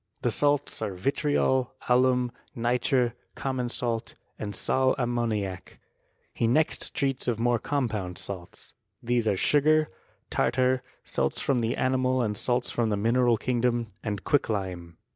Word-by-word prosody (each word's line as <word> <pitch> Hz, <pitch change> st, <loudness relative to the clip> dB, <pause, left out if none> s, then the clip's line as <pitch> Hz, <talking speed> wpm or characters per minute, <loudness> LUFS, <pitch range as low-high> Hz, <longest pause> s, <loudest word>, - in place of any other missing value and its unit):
The 120 Hz, -, +2 dB
salts 145 Hz, +1 st, +1 dB
are 105 Hz, -4 st, -2 dB
vitriol, 130 Hz, +3 st, +1 dB
alum, 125 Hz, 0 st, +3 dB, 0.2 s
nitre, 120 Hz, +1 st, +1 dB, 0.2 s
common 130 Hz, -2 st, -2 dB
salt, 120 Hz, -2 st, -2 dB, 0.2 s
and 105 Hz, -2 st, -4 dB
sal 130 Hz, +6 st, +2 dB
ammoniac. 115 Hz, -7 st, -2 dB, 0.5 s
He 115 Hz, -, +1 dB
next 155 Hz, +7 st, +1 dB
treats 135 Hz, -2 st, -1 dB
of 120 Hz, -3 st, +1 dB
more 120 Hz, 0 st, +2 dB
compound 110 Hz, -11 st, -2 dB
salts. 95 Hz, -2 st, -8 dB, 0.3 s
These 120 Hz, -1 st, +1 dB
are 100 Hz, -, +2 dB
sugar, 155 Hz, +6 st, +3 dB, 0.4 s
tartar, 130 Hz, 0 st, +2 dB, 0.2 s
salts 70 Hz, 0 st, -1 dB
from 130 Hz, -4 st, +1 dB
the 115 Hz, 0 st, -1 dB
animal 130 Hz, -1 st, +2 dB
and 105 Hz, -2 st, -1 dB
salts 120 Hz, +3 st, -1 dB
from 115 Hz, -2 st, 0 dB
the 105 Hz, -, 0 dB
mineral 120 Hz, +2 st, +3 dB
kingdom, 120 Hz, -2 st, 0 dB
and 105 Hz, -3 st, -3 dB
quicklime. 95 Hz, -, -1 dB
120 Hz, 135 wpm, -27 LUFS, 110-130 Hz, 0.5 s, alum